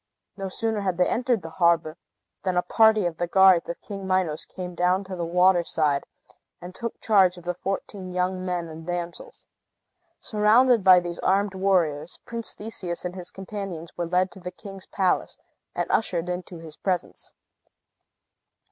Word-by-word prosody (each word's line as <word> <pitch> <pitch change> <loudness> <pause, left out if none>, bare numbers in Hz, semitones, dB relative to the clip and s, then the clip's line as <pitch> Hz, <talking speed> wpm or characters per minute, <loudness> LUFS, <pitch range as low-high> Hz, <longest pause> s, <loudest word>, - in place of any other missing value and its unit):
No 195 -1 -5
sooner 220 +2 -2
had 185 -3 -1
they 180 - +3
entered 240 -5 0
the 165 - -7
harbor 170 -2 +3 0.5
than 185 -2 -1
a 180 - +3
party 220 +1 +4
of 170 -2 -2
the 175 - -1
guards 190 -2 +5
of 170 - -4
King 195 -2 -7
Minos 185 -5 0
came 180 -1 -7
down 180 +2 +1
to 190 -1 -7
the 175 - -3
water 180 +1 +4
side, 150 -4 0 0.5
and 180 +1 -9
took 230 +4 -6
charge 190 -4 +4
of 175 - -11
the 180 +1 -2
fourteen 190 +1 -5
young 185 +1 -1
men 180 -2 -2
and 160 +1 -10
damsels. 175 -1 -5 0.7
Surrounded 225 +2 +4
by 185 -1 +8
these 175 -1 -6
armed 195 +1 +1
warriors, 175 -5 0
Prince 230 -1 -4
Theseus 185 -5 -5
and 180 - -3
his 180 -1 -6
companions 190 -4 -7
were 175 -1 -3
led 185 +2 +1
to 195 - -12
the 180 0 -6
king's 195 +1 -10
palace, 190 -2 0 0.4
and - - 0
ushered 180 -5 0
into 180 0 -5
his 160 -2 -10
presence. 185 -2 -3
185 Hz, 170 wpm, -25 LUFS, 175-195 Hz, 0.7 s, by